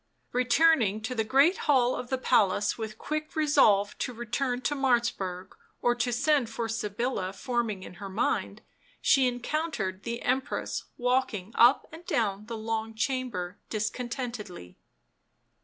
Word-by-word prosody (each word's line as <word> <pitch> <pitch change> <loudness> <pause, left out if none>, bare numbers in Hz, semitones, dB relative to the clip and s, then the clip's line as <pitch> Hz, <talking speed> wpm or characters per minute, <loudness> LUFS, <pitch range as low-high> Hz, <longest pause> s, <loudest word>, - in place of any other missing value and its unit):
Returning 250 -4 +3
to 235 +4 -3
the 225 -3 0
great 275 - +4
hall 255 -3 +4
of 245 - -6
the 260 - 0
palace 210 -5 +2
with 220 -1 -6
quick 305 +3 -4
resolve 275 -10 +4
to - - -2
return 245 +2 -2
to 275 +2 0
Martzburg 235 -9 0 0.3
or 240 - +2
to 240 0 -1
send 280 0 +2
for 230 0 -3
Sybilla 215 -2 -2
forming 225 -3 -2
in - - -10
her 200 - -5
mind, 190 +3 -1 0.4
she 265 -2 +4
encountered 245 - -2
the 235 +2 -5
Empress 260 +1 -1
walking 245 -6 0
up 240 +4 +5
and 325 +2 -11
down 210 -2 -1
the 230 -1 -5
long 220 0 -3
chamber 220 -8 -2
discon 220 +3 -2
tentedly. 220 - -6
240 Hz, 140 wpm, -28 LUFS, 215-260 Hz, 0.4 s, up